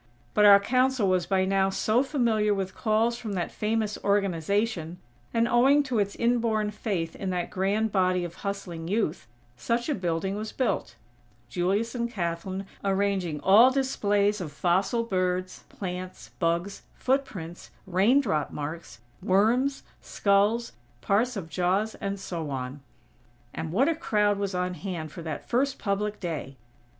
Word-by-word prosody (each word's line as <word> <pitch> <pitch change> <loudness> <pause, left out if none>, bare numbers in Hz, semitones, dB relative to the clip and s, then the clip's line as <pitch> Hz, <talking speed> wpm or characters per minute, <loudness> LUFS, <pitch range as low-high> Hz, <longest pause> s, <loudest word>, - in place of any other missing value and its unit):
But 210 - +5
our 200 -1 +9
Council 255 +1 +2
was 185 -2 +1
by 190 -1 +2
now 195 0 +2
so 215 +5 +2
familiar 230 -7 +1
with 190 -1 -3
calls 225 +2 +1
from 215 -4 -5
that 175 -3 -2
famous 215 -1 -1
"Organization", 200 -2 0 0.3
and, 230 0 +2
owing 270 +5 +4
to 255 -5 -1
its 200 -1 -1
inborn 230 -3 +1
faith 195 -6 -3
in 195 - -4
that 180 -1 -2
grand 205 +4 0
body 185 -2 +2
of 170 -1 -7
hustling 185 -5 -4
Youth, 185 - -1 0.3
such 235 - -1
a - - +2
building 185 -2 -2
was 215 +1 -5
built; 220 - -1 0.5
Julius 195 - 0
and 235 -1 -2
Kathlyn 185 0 -3 0.2
arranging 195 -5 0
all 215 +9 +7
displays 210 -6 +1
of 160 -5 -5
fossil 185 - +1
birds, 185 -3 -2
plants, 185 -1 -7
"bugs," 170 +3 -1
footprints, 215 -11 -2 0.2
raindrop 195 - +2
marks, 150 -5 -7 0.2
worms, 235 +8 +2 0.2
skulls, 205 +4 +1 0.3
parts 225 - +1
of 180 -4 -5
jaws, 185 +6 0
and 200 -1 -3
so 165 -5 -5
on. 135 +1 -5 0.7
And 160 -1 -4
what 245 - +3
a 330 - +3
crowd 210 -10 +1
was 200 -2 -2
on 180 0 -1
hand 175 -5 -5
for 170 - -8
that 160 -3 -6
first 265 +3 +1
public 210 +1 -2
day! 150 -6 -5
200 Hz, 145 wpm, -27 LUFS, 180-225 Hz, 0.7 s, our